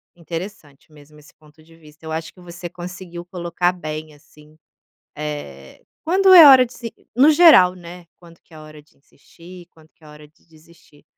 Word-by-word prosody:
Interessante 165 -4 -11
mesmo 150 0 -20
esse 150 0 -21
ponto 155 +1 -24
de 165 +1 -22
vista, 155 0 -20
eu 160 - -8
acho 160 0 -6
que 180 - -20
você 175 0 -10
conseguiu 175 0 -11
colocar 175 0 -3
bem, 155 -3 -9
assim, 150 +1 -23 0.6
eh, 145 - -9 0.2
quando 380 +4 +2
é 330 -4 +10
hora 260 -2 +7
de 240 - -18
se 230 -2 -10 0.2
no 270 +6 +4
geral, 300 - +5
né, 175 0 -14
quando 170 -1 -20
que - - -30
é 155 - -13
hora 155 -1 -15
de 150 - -34
insistir, 170 +5 -18
quando 160 -1 -24
que - - -38
é - - -17
hora 150 0 -16
de 150 - -33
desistir. 160 -2 -24
165 Hz, 190 wpm, -19 LUFS, 155-180 Hz, 0.6 s, é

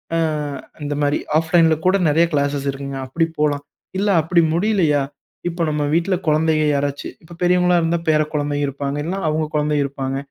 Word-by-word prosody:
அ - - +2 0.6
இந்த 145 0 -2
மாரி 145 0 +2 0.2
ஆஃப்லைன்ல 165 0 +3
கூட 185 +1 +4
நிறைய 165 +3 +4
கிளாஸ்சஸ் 145 -1 0
இருக்குங்க. 135 0 -6
அப்படி 165 +6 +1
போலாம். 145 -1 +1 0.4
இல்ல 205 - 0
அப்படி 170 +2 +3
முடியலையா? 170 -6 +2 0.5
இப்போ 170 0 -2
நம்ம 150 -1 -1
வீட்ல 170 +3 +2
குழந்தைக 155 0 +2
யாராச்சு, 140 0 -2
இப்ப 170 +1 -13
பெரியவங்களா 180 0 +3
இருந்தா 165 +1 0
பேர 155 -1 +4
குழந்தைகள 145 -1 -1
இருப்பாங்க. 140 +1 -3
இல்லன்னா 185 +5 -3
அவங்க 155 +1 0
குழந்தைக 150 -1 +1
இருப்பாங்க. 135 -1 -3
155 Hz, 165 wpm, -20 LUFS, 145-170 Hz, 0.6 s, கூட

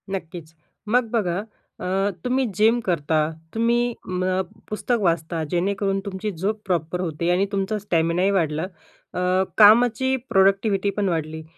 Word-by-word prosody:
नक्कीच. 165 -3 -8 0.3
मग 240 +1 +2
बघा 200 -4 0 0.4
अ, - - -6 0.4
तुम्ही 255 +1 +1
जिम 225 +3 +4
करता, 160 -5 0 0.4
तुम्ही 235 +1 +2 0.3
म 185 +1 0 0.3
पुस्तक 230 +2 -1
वाचता 165 -2 0
जेणेकरून 195 +2 0
तुमची 200 +2 -4
झोप 205 +5 -3
प्रॉपर 175 -2 -1
होते 170 0 -2
आणि 185 +2 +2
तुमचा 200 +1 -1
स्टॅमिनाही 175 0 +1
वाढला 160 -5 0 0.5
अ, - - -3 0.4
कामाची 240 +4 +6
प्रोडक्टिव्हिटी 195 +1 +3
पण 200 -2 +1
वाढली. 160 -1 -3
195 Hz, 130 wpm, -23 LUFS, 170-215 Hz, 0.5 s, कामाची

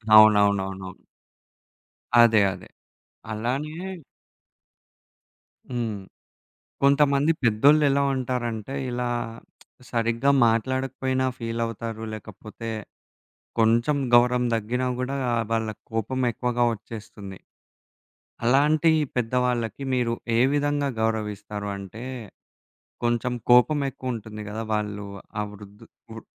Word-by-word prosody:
అవునవునవును. 100 -3 +5 1.3
అదే. 110 -3 +6
అదే. 90 - -12 0.6
అలానే 130 +8 -2 2.0
హ్మ్. 115 -4 -2 0.8
కొంతమంది 140 +2 +4
పెద్దోళ్లెలా 140 +5 +4
ఉంటారంటే 125 -2 -3 0.2
ఇలా 125 0 -2 0.8
సరిగ్గా 115 +3 +2 0.2
మాట్లాడకపోయినా 130 +3 0
ఫీలవుతారు 115 -1 -4
లేకపోతే 110 +2 -8 0.9
కొంచెం 115 +6 +3 0.2
గౌరవం 125 +1 +5
దగ్గినా 125 +4 -2
గూడా 130 +2 -2 0.4
వాళ్ళకి 110 -2 -2
కోపమెక్కువగా 120 +1 -1
ఒచ్చేస్తుంది. 105 -3 -10 1.1
అలాంటి 150 +5 +4 0.2
పెద్దవాళ్ళకి 125 +1 0
మీరు 120 -2 +1 0.2
ఏ - - +4
విధంగా 145 0 +1
గౌరవిస్తారు? 105 -2 -2
అంటే 100 +4 -9 1.0
కొంచెం 120 +1 0 0.2
కోపమెక్కువుంటుంది 125 -5 +2
గదా! 110 +2 -4
వాళ్ళు 105 -1 -3 0.3
ఆ - - +1
వృధ్ 105 0 -13 0.3
వృ 115 - -7
115 Hz, 75 wpm, -25 LUFS, 110-130 Hz, 2.0 s, అదే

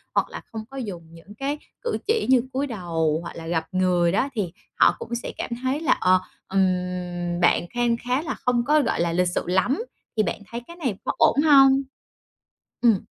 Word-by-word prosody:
hoặc - - +2
là - - -7
không 220 -2 -5
có 270 - -9
dùng 200 -10 -5
những 180 +5 -14
cái 280 +5 -2 0.2
cử 480 - -1
chỉ 445 0 +2
như 260 -2 +6
cúi 275 +2 0
đầu, 165 - -1
hoặc 170 - -8
là 165 -1 -8
gặp 165 -1 0
người 180 -2 +2
đó 260 +8 +1
thì 200 -8 -2 0.3
họ - - +6
cũng 235 - -4
sẽ 240 - -4
cảm - - -4
thấy 260 +3 0
là, 320 - +3
ờ, 185 0 +5 0.3
ừm, 180 -2 -1
bạn 175 - +4
khan 240 -1 +1
khá 250 +3 -1
là 330 - -4
không 245 -1 +2
có, 300 +2 +4
gọi 275 - 0
là, 170 -1 0
lịch 180 +1 +2
sự - - 0
lắm, 215 - +1 0.3
thì 215 - +4
bạn - - -3
thấy 235 +1 -4
cái 340 - -10
này 265 - -2
có - - +1
ổn 285 - +4
hông? 275 -3 +6 1.0
Ừm. 225 -6 +4
215 Hz, 210 wpm, -24 LUFS, 180-270 Hz, 1.0 s, như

